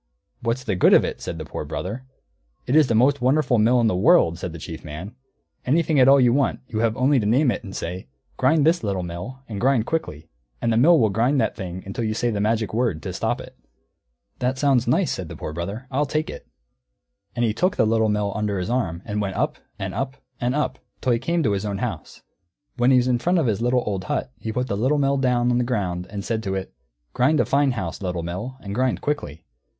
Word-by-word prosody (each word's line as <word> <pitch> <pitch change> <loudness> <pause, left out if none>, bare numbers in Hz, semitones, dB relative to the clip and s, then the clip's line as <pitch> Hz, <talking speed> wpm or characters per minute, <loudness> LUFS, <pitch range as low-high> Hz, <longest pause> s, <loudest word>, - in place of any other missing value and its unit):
"What's 115 +2 -1
the 105 - -1
good 90 - +6
of - - +5
it?" - - -5
said 85 - -5
the 80 - -6
Poor - - -5
Brother. 115 +8 -5 0.6
"It 130 - 0
is 155 -3 +6
the 115 - +1
most 135 +5 +3
wonderful 130 -1 +3
mill 120 +4 +4
in 115 - +3
the 110 - +2
world," 95 - +4
said 90 - -4
the 85 - -8
Chief 80 +1 -8
Man. 80 +8 -7 0.5
"Anything 155 +2 +2
at 130 - +6
all 135 - +8
that 135 - +4
you 120 -1 +4
want, 140 0 +1
you 110 - -3
have 115 +1 +1
only 135 +1 +3
to 105 - -1
name 125 +4 +3
it, - - -4
and 95 -3 -8
say, 90 0 -5 0.3
'Grind 155 -2 +3
this, 165 -1 +3
Little 100 -3 -1
Mill, 90 +11 -7
and 105 -3 -5
grind 130 -3 +3
quickly,' 85 - -3 0.3
and 115 - +1
the - - +2
Mill 160 +7 +6
will 110 -3 +3
grind 120 +7 +2
that 110 - 0
thing 95 -2 -6
until 100 +4 -4
you 110 -1 -1
say 120 +1 0
the 105 -2 -2
magic 110 0 0
word, 110 -10 0
to - - -4
stop - - -1
it." - - -11 0.8
"That 125 +1 0
sounds 130 -3 +2
nice," 165 +9 +2
said 90 -4 -4
the - - -7
Poor 75 - -6
Brother. 100 +9 -5
"I'll 140 +2 +1
take 155 +3 -1
it." - - -10 0.9
And 120 - +1
he 110 - +1
took 180 - +1
the - - +3
Little 110 0 +2
Mill 105 -1 0
under 105 -2 -1
his 90 +5 -2
arm, 95 -9 -1
and 105 -1 -2
went 95 -2 -3
up, - - -1 0.2
and 95 -2 -4
up, 130 +6 -3 0.2
and 125 +2 0
up, 150 - -1 0.2
till 130 - +1
he 115 - +1
came 165 +6 0
to 110 - +2
his 100 0 -1
own 100 -2 -2
house. 95 -9 -5 0.5
When 120 0 +3
he 130 - +6
was 125 0 +2
in 125 -1 +2
front 175 +8 +1
of 160 - +2
his 110 -3 0
little 125 +1 +2
old 95 -3 -3
hut, 125 - -2
he 110 - -4
put 125 +3 -1
the 100 - -2
Little 130 +8 +1
Mill 140 -1 +2
down 125 -2 +2
on 120 - +2
the - - +2
ground 95 -7 -2
and 100 -1 -6
said 110 -1 -1
to 95 -3 -3
it, 95 0 -5 0.4
"Grind 145 +5 +3
a - - +3
fine 140 -1 +2
house, 95 -8 -5
Little 90 -3 -3
Mill, 95 +10 -5
and 100 -1 -6
grind 130 +3 0
quickly." 115 - -3
115 Hz, 250 wpm, -23 LUFS, 100-130 Hz, 0.9 s, all